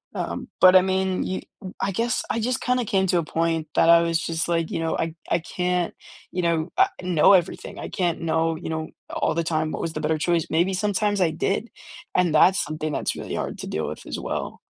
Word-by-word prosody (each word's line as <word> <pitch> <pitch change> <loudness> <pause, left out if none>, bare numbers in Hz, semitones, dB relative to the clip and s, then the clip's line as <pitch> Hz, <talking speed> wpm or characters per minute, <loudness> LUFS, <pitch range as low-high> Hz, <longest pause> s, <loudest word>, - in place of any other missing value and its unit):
um, - - -4
but, 185 0 +8
I 185 - +9
mean, 190 0 0
you 185 - -3 0.2
w 185 -3 -8
I 195 - 0
guess 230 +6 0
I 230 - -1
just 245 +2 -1
kinda 250 0 +1
came 190 -2 +1
to 175 -1 +2
a 165 - -1
point 165 0 -1
that 165 - +4
I 170 0 +8
was 165 -1 +1
just, 165 0 -2
like, 165 -1 0
you - - -2
know, 165 0 -1
I 165 -1 -2 0.2
I 170 - +3
can't, 180 +1 -1 0.4
you 180 - -1
know, 170 -1 0
uh, - - +7 0.2
know 180 +1 +5
everything. 180 -2 0
I - - -6
can't 175 -3 -1
know, 165 0 +1
you 160 - -6
know, 160 0 -3 0.2
all - - 0
the 170 - +1
time 155 -1 -1
what - - -4
was 165 - -3
the 155 - -4
better 155 +1 +1
choice, 170 +1 +1
maybe 175 +4 +2
sometimes 205 +1 0
I 175 - +4
did, 195 +8 -1 0.5
and 180 -3 +3
that's 185 +5 +5
something 155 0 -4
that's - - -1
really - - -5
hard - - -4
to - - -6
deal - - -2
with - - -7
as - - -4
well. - - -4
170 Hz, 235 wpm, -24 LUFS, 160-190 Hz, 0.5 s, I